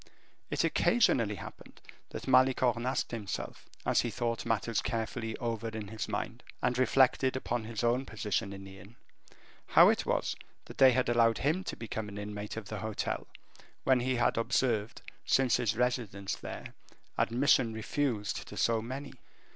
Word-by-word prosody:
It -, -, 0 dB
occasionally 115 Hz, -, +3 dB
happened -, -, -11 dB, 0.3 s
that -, -, -7 dB
Malicorne 130 Hz, -2 st, +3 dB
asked 130 Hz, -, -1 dB
himself, 105 Hz, -5 st, -5 dB, 0.2 s
as -, -, +3 dB
he 120 Hz, -, -2 dB
thought 115 Hz, -1 st, -2 dB
matters 115 Hz, -1 st, 0 dB
carefully 115 Hz, 0 st, -3 dB
over 115 Hz, -1 st, -3 dB
in 110 Hz, -2 st, -6 dB
his 110 Hz, 0 st, -4 dB
mind, -, -, -3 dB, 0.2 s
and 125 Hz, -, +1 dB
reflected 130 Hz, +1 st, +3 dB
upon 120 Hz, -3 st, -2 dB
his 110 Hz, 0 st, -4 dB
own 125 Hz, +3 st, +1 dB
position 105 Hz, -2 st, -2 dB
in 95 Hz, 0 st, -8 dB
the 95 Hz, 0 st, -11 dB
inn, 100 Hz, +6 st, -15 dB, 0.7 s
how -, -, +7 dB
it -, -, +1 dB
was -, -, 0 dB, 0.3 s
that -, -, -12 dB
they 130 Hz, -1 st, +8 dB
had 130 Hz, +1 st, +1 dB
allowed 115 Hz, -1 st, +4 dB
him 160 Hz, +7 st, 0 dB
to -, -, -4 dB
become 110 Hz, -2 st, -5 dB
an 100 Hz, -, -9 dB
inmate 105 Hz, +1 st, -5 dB
of 110 Hz, -3 st, -6 dB
the 105 Hz, -, -5 dB
hotel, 110 Hz, -1 st, -3 dB, 0.6 s
when 130 Hz, -1 st, +4 dB
he 130 Hz, +1 st, 0 dB
had 120 Hz, -, +2 dB
observed, 115 Hz, -2 st, 0 dB, 0.2 s
since 130 Hz, -3 st, +3 dB
his 110 Hz, -1 st, 0 dB
residence 115 Hz, -6 st, -1 dB
there, -, -, -8 dB, 0.4 s
admission 125 Hz, -1 st, +3 dB
refused 110 Hz, -1 st, -2 dB
to -, -, -9 dB
so 115 Hz, -1 st, +2 dB
many. 130 Hz, +3 st, -6 dB
115 Hz, 165 wpm, -31 LUFS, 110-130 Hz, 0.7 s, they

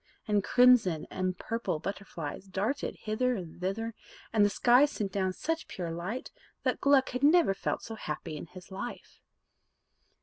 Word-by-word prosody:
And 205 Hz, -2 st, +2 dB
crimson 230 Hz, -9 st, +5 dB
and 185 Hz, -1 st, -1 dB
purple 230 Hz, -6 st, -2 dB
butterflies 185 Hz, -2 st, -6 dB
darted 210 Hz, +9 st, -2 dB
hither 245 Hz, +4 st, 0 dB
and 175 Hz, -4 st, -8 dB
thither, 225 Hz, +5 st, -2 dB, 0.4 s
and 215 Hz, -2 st, +5 dB
the 205 Hz, -, +5 dB
sky 245 Hz, +6 st, +5 dB
sent 210 Hz, -9 st, -3 dB
down 190 Hz, -1 st, 0 dB
such 325 Hz, -, -3 dB
pure 175 Hz, -3 st, -4 dB
light, 180 Hz, +10 st, -4 dB, 0.3 s
that -, -, 0 dB
Gluck 280 Hz, -1 st, +4 dB
had 250 Hz, -, -3 dB
never 305 Hz, -, +5 dB
felt 195 Hz, -, -3 dB
so 225 Hz, -, -6 dB
happy 155 Hz, -5 st, -5 dB
in 150 Hz, -, -7 dB
his 180 Hz, +3 st, -13 dB
life. 240 Hz, +6 st, -7 dB
205 Hz, 160 wpm, -30 LUFS, 185-250 Hz, 0.4 s, crimson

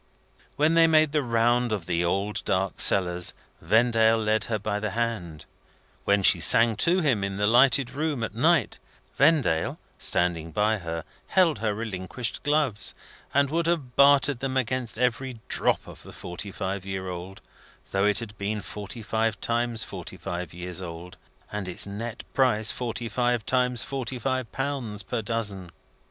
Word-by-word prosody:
When 155 Hz, +2 st, +2 dB
they 165 Hz, 0 st, +6 dB
made 155 Hz, -2 st, +4 dB
the 150 Hz, 0 st, +1 dB
round 120 Hz, 0 st, +1 dB
of 100 Hz, -6 st, -2 dB
the 85 Hz, 0 st, 0 dB
old 100 Hz, +4 st, -1 dB
dark 95 Hz, 0 st, -1 dB
cellars, 90 Hz, -2 st, +4 dB, 0.3 s
Vendale 115 Hz, +4 st, +3 dB
led 110 Hz, 0 st, 0 dB
her 110 Hz, -, -1 dB
by 105 Hz, 0 st, -3 dB
the 110 Hz, +1 st, -2 dB
hand; 95 Hz, -10 st, -3 dB, 0.6 s
when 100 Hz, -1 st, +2 dB
she 90 Hz, -, +5 dB
sang 115 Hz, +6 st, +6 dB
to 180 Hz, +7 st, +3 dB
him 125 Hz, -, +1 dB
in 100 Hz, 0 st, -3 dB
the 105 Hz, -, +1 dB
lighted 125 Hz, +3 st, +4 dB
room 145 Hz, -4 st, -2 dB
at 115 Hz, -, -4 dB
night, 150 Hz, +2 st, +2 dB, 0.4 s
Vendale, 140 Hz, -, +2 dB, 0.2 s
standing 85 Hz, -2 st, 0 dB
by 105 Hz, +4 st, +1 dB
her, 85 Hz, -2 st, -5 dB, 0.2 s
held 170 Hz, -, +3 dB
her 105 Hz, -1 st, -1 dB
relinquished 110 Hz, +1 st, -4 dB
gloves, 145 Hz, -7 st, 0 dB, 0.4 s
and 140 Hz, 0 st, +2 dB
would 165 Hz, +1 st, 0 dB
have 145 Hz, -8 st, -2 dB
bartered 140 Hz, -2 st, +4 dB
against 130 Hz, -2 st, -2 dB
them 120 Hz, -, -1 dB
every 125 Hz, 0 st, -1 dB
drop -, -, +1 dB
of -, -, -13 dB
the -, -, -13 dB
forty 90 Hz, +3 st, -7 dB
five 95 Hz, 0 st, -4 dB
year 95 Hz, -1 st, -5 dB
old, 90 Hz, +2 st, -7 dB, 0.5 s
though 95 Hz, +1 st, +1 dB
it 105 Hz, -1 st, +2 dB
had 115 Hz, -2 st, -5 dB
been 105 Hz, +1 st, -3 dB
forty 105 Hz, +2 st, -7 dB
five 110 Hz, 0 st, -1 dB
times 120 Hz, -1 st, -1 dB
forty 95 Hz, -2 st, -8 dB
five 90 Hz, -2 st, -5 dB
years 90 Hz, +1 st, -6 dB
old, 85 Hz, 0 st, -8 dB, 0.4 s
and 105 Hz, -2 st, -4 dB
its 90 Hz, -, +1 dB
nett 110 Hz, +4 st, -6 dB
price 115 Hz, -5 st, +3 dB
forty 120 Hz, -1 st, -4 dB
five 120 Hz, 0 st, 0 dB
times 125 Hz, -2 st, +1 dB
forty 130 Hz, -2 st, -4 dB
five 130 Hz, -1 st, -2 dB
pounds 130 Hz, -7 st, -3 dB
per 115 Hz, +4 st, -3 dB
dozen. 105 Hz, -5 st, -2 dB
110 Hz, 165 wpm, -26 LUFS, 95-130 Hz, 0.6 s, they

